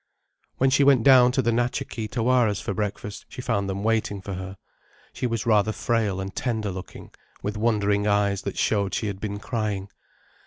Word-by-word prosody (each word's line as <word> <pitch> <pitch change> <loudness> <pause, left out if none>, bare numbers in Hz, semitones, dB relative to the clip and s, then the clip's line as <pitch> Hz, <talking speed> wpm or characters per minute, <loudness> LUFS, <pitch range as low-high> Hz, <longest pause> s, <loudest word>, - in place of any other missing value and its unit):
When 135 +1 +3
she 140 +1 +4
went 135 -4 +5
down 125 -1 +7
to 130 - +1
the 115 - +2
Natcha 120 +1 0
Kee 110 -2 -5
Tawaras 115 -2 +2
for 100 - -3
breakfast 105 0 -4
she - - -10
found 115 -6 -1
them 95 +1 -3
waiting 110 -2 0
for 100 +1 -6
her. 95 +1 -6 0.6
She 125 - -2
was 115 -3 -2
rather 110 -1 +3
frail 110 -4 0
and 95 0 -5
tender 110 -5 -2
looking, 90 0 -9 0.3
with 105 +1 -2
wondering 105 -2 +1
eyes 100 -1 +2
that - - -5
showed 100 -3 +1
she - - -2
had 100 -2 -4
been 100 -1 -3
crying. 105 -3 -3
105 Hz, 190 wpm, -25 LUFS, 100-120 Hz, 0.6 s, down